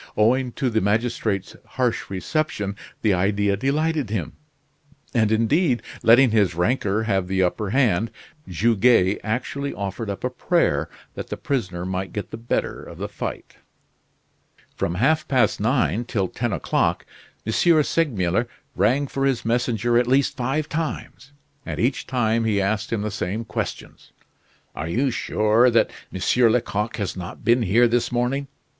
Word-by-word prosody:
Owing 125 +4 +3
to 130 -3 -1
the 110 0 +1
magistrate's 105 -2 -1
harsh 125 -3 -2
reception 100 - -2 0.3
the 105 -3 +4
idea 100 +2 +1
delighted 145 +3 0
him; 100 -7 -3 0.8
and, 110 -4 +2
indeed, 120 +5 +2 0.2
letting 120 +2 +6
his 100 -6 +2
rancor 105 +2 +1
have 95 -4 0
the 95 0 +1
upper 95 +3 -1
hand, 115 -4 +2 0.4
Goguet 105 +1 +3
actually 130 +6 -3
offered 100 +2 -4
up 100 - -5
a 125 - -1
prayer 105 - +1 0.2
that - - -6
the - - -5
prisoner 95 -10 -2
might 95 +1 -3
get 105 - -5
the - - -5
better 115 +1 -2
of - - -11
the - - -4
fight. - - -6 1.2
From 85 - -2
half 150 - +2
past 130 -3 +2
nine 120 0 +1
till 100 -6 -1
ten 120 +5 -3
o'clock - - 0 0.4
M. 110 - -2
Segmuller 130 - +2 0.3
rang 120 +10 +2
for 135 0 -3
his 135 -5 0
messenger 120 0 +1
at 120 - 0
least 135 +2 +2
five 135 +4 -1
times, 155 -3 -5 0.3
and - - -5
each 125 +4 0
time 115 -3 +1
he 105 -2 +1
asked 105 +3 -1
him 110 -3 -1
the 105 - -2
same 105 +3 -3
questions: - - -6 0.6
"Are 80 - -4
you 130 +9 +1
sure 110 +2 +3
that 115 -1 +3 0.2
M. 95 - -5 0.3
Lecoq 110 -2 -1
has 100 -4 -3
not 90 +1 -8
been 120 +2 +4
here 115 +4 +4
this 120 +1 0
morning? 125 +3 -1
115 Hz, 150 wpm, -23 LUFS, 100-125 Hz, 1.2 s, letting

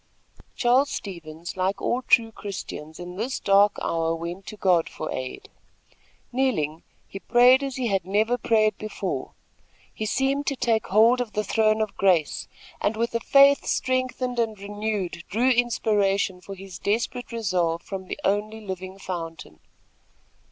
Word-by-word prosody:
Charles 260 +3 +3
Stevens, 170 -3 -7
like 190 +1 -1
all 245 - 0
true 230 -2 +3
Christians, 180 -7 -7
in 180 +1 -8
this 245 +6 -2
dark 200 +1 +4
hour 165 0 0
went 170 +3 -6
to 215 - -8
God 180 -4 +2
for 155 - -6
aid. 130 0 -5 0.8
Kneeling, 195 - 0 0.3
he 195 - -8
prayed 250 +5 +5
as 270 -2 -3
he 255 - -2
had 195 -5 +1
never 210 +6 +1
prayed 215 -3 +2
before. 215 0 -4 0.6
He 215 - -3
seemed 275 +5 0
to 275 - +1
take 230 -3 0
hold 230 +5 +5
of 230 -3 -5
the 210 - 0
throne 215 +1 +2
of 215 -2 -2
grace 175 -6 +2 0.3
and, 215 +1 0
with 230 +1 -1
a 230 - +1
faith 275 +3 +5
strengthened 255 -1 -1
and 220 -3 -1
renewed, 200 -4 -3
drew 245 +5 +2
inspiration 205 -6 +1
for 195 +1 -8
his 190 -2 -10
desperate 230 +3 -2
resolve 180 -7 0
from 190 -1 -6
the - - -5
only 210 +2 0
living 190 -1 -6
fountain. 165 - -7
210 Hz, 150 wpm, -25 LUFS, 185-235 Hz, 0.8 s, prayed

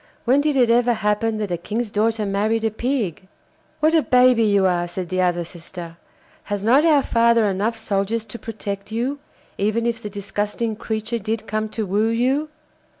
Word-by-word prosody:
When 260 +4 +4
did 295 -1 +1
it 245 -3 +4
ever 240 0 +3
happen 210 +1 0
that 210 -3 -3
a 175 - 0
king's 215 +5 -3
daughter 220 +1 +1
married 215 +3 0
a 220 - +1
pig?' 215 - -2 0.5
'What 310 +1 +4
a 325 - +5
baby 250 -3 +4
you 200 -3 +3
are!' 175 -1 +1
said 175 0 -5
the 185 0 0
other 175 -1 +1
sister; 170 0 -9 0.5
'has 205 -1 -3
not 255 +7 +5
our 300 -4 +4
father 235 -1 +3
enough 205 +4 0
soldiers 215 +1 -1
to 225 +2 -9
protect 200 -2 -6
you, 250 +6 -2 0.4
even 215 +3 +1
if 230 -1 -1
the 210 - -5
disgusting 205 +2 -3
creature 220 +2 -3
did 220 +1 -3
come 215 +1 -2
to 220 0 -3
woo 205 +3 +1
you? 260 +6 +1
220 Hz, 185 wpm, -22 LUFS, 200-235 Hz, 0.5 s, a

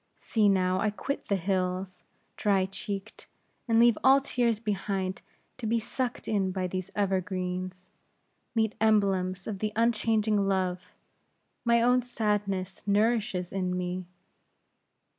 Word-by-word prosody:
See, 215 -3 +2
now, 185 -1 +2
I 215 - +2
quit 275 +7 -4
the 200 - +2
hills, 185 0 -2 0.3
dry 195 -2 +2
cheeked; 195 +1 -6 0.4
and 225 -1 +3
leave 235 -1 +5
all 270 +1 +7
tears 240 -5 0
behind 195 -3 -2 0.4
to 230 - -3
be 230 +1 +2
sucked 245 +2 -4
in 200 -3 +1
by 185 0 -2
these 185 +1 -4
evergreens, 185 -2 -2 0.6
meet 220 -1 +2
emblems 195 -4 +2
of 205 -3 -4
the 215 +1 -1
unchanging 220 -2 +2
love, 185 -2 0 0.8
my 235 -1 +4
own 250 +1 +4
sadness 205 -5 -2
nourishes 205 -3 +1
in 185 -2 -1
me. 180 0 -3
200 Hz, 125 wpm, -28 LUFS, 185-220 Hz, 0.8 s, all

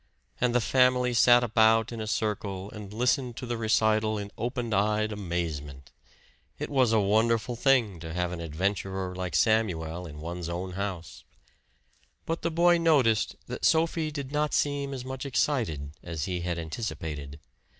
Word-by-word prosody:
And 125 -1 +1
the - - +5
family 125 0 +3
sat 120 +1 +6
about 110 0 +3
in 115 -1 -5
a 110 - -4
circle 100 -3 -2
and 105 -2 -9
listened 125 +2 0
to 125 - -5
the 120 0 -2
recital 110 -1 +2
in 100 0 -6
open 120 -2 -3
eyed 105 +2 +1
amazement. 80 -8 -4 0.7
It - - -5
was 130 -5 +3
a 110 - +4
wonderful 110 +4 +2
thing 120 -8 +2
to 80 0 -7
have 90 +1 -1
an 85 -2 -5
adventurer 95 +3 -2
like 90 -3 -4
Samuel 90 -4 +1
in 75 -1 -10
one's 85 +2 -5
house! 90 0 -5 1.0
But 165 +1 -2
the 170 - 0
boy 170 +1 +4
noticed 135 -10 +3
that - - -7
Sophie 160 -1 +2
did 140 -3 -6
not 150 0 0
seem 145 -1 0
as 130 -2 -6
much 130 0 -5
excited 115 - -1
as 80 -4 -4
he 90 -2 -3
had 85 0 -2
anticipated. 80 -5 -5
110 Hz, 160 wpm, -28 LUFS, 90-125 Hz, 1.0 s, sat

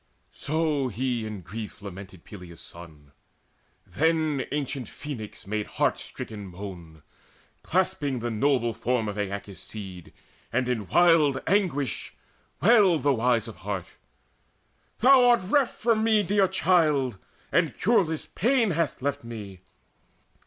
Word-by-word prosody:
So 150 -2 0
he 120 0 -2
in 105 -3 -6
grief 105 +5 -8
lamented 95 -3 -10
Peleus' 90 -5 -11
son. 80 -4 -12 0.7
Then 155 -3 0
ancient 140 -4 -3
Phoenix 125 -8 -8
made 105 +1 -2
heart - - +2
stricken 105 -2 -8
moan, 85 -5 -9 0.6
Clasping 170 -7 0
the 120 0 -3
noble 120 0 +1
form 115 0 -1
of 105 - -3
Aeacus' 100 -2 -4
seed, 95 -5 -9 0.4
And 125 +1 0
in 115 -6 -2
wild 160 - +4
anguish 165 - 0 0.5
wailed 195 -6 +5
the 140 -1 +4
wise 120 -1 +1
of 115 - -9
heart: 95 -3 -4 1.2
"Thou 260 +1 +7
art 240 -3 +5
reft 265 +5 +2
from 225 -1 +2
me, 220 -2 +4
dear 195 +1 +3
child, 155 - +2 0.3
and - - +2
cureless 175 -7 +2
pain 235 0 +1
Hast 165 -5 -1
left 140 0 -1
to 115 - -12
me! 105 -5 -8
130 Hz, 130 wpm, -26 LUFS, 105-165 Hz, 1.2 s, Thou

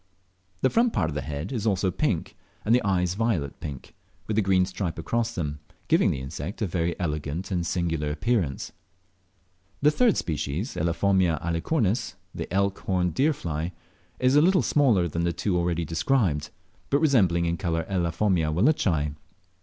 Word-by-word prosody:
The 130 - +3
front 230 0 +3
part 80 -4 0
of - - -5
the 75 - -2
head 70 +6 -5
is 115 -4 -2
also 95 -2 +1
pink, 95 - -1 0.3
and 110 - +3
the 125 - +5
eyes 90 -3 +1
violet 100 -10 -1
pink, 70 -5 -8 0.3
with 110 - -2
a 110 - +4
green 95 -2 +3
stripe 90 -2 -4
across 115 +7 -1
them, 75 -4 -3 0.3
giving - - +4
the 65 - -2
insect 70 +7 -6
a - - +2
very 85 -2 -1
elegant 75 +2 -3
and 90 -2 0
singular 85 -3 -1
appearance. 80 - -1 1.1
The 150 - +6
third 235 +5 +3
species 80 - -2
(Elaphomia 85 0 +2
alcicornis, 100 - 0 0.2
the - - -6
elk 100 +1 +1
horned 90 -3 0
deer 145 +4 +3
fly) 85 - -4 0.4
is 130 +2 +3
a 145 - +7
little 180 -2 +4
smaller 120 -13 +3
than 85 +1 -2
the 85 - +1
two 95 +1 -1
already 85 -1 0
described, 80 - +1 0.4
but 140 - +3
resembling 100 - +3
in 85 0 0
colour 85 -1 -1
Elaphomia 90 -2 +1
wallacei. 85 - +2
90 Hz, 165 wpm, -26 LUFS, 80-110 Hz, 1.1 s, a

